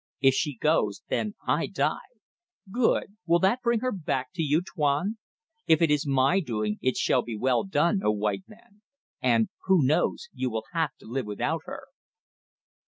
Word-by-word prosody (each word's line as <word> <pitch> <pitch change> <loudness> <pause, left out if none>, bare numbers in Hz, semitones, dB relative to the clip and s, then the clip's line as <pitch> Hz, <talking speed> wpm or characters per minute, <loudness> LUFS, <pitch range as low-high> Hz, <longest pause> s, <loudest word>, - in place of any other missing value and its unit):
If 135 -1 +5
she 145 +1 -1
goes 110 -8 +1
then 210 -1 -1
I - - +1
die. - - -2 0.6
Good! 225 -3 +1
Will 170 +1 +5
that 190 +8 +2
bring 235 -2 +1
her 255 - 0
back 135 - -3
do 180 - -3
you 150 -1 +2
think 180 - -11
Tuan? 155 +9 0 0.5
If 160 -1 +5
it 165 -3 +3
is 150 0 +1
my 135 +6 +3
doing 110 - -2
it 130 - 0
shall 125 - +2
be 120 -2 -6
well 125 +3 +2
done, 190 +1 +1
O - - +2
white 105 -2 -1
man! 210 -1 -19 0.4
and 115 -3 +3 0.2
who 185 -7 +4
knows 155 - +1
you 130 - -2
will 110 -1 -4
have 160 -5 0
to - - -15
live 125 0 -3
without 105 -1 -2
her." - - -7
150 Hz, 180 wpm, -27 LUFS, 125-190 Hz, 0.6 s, If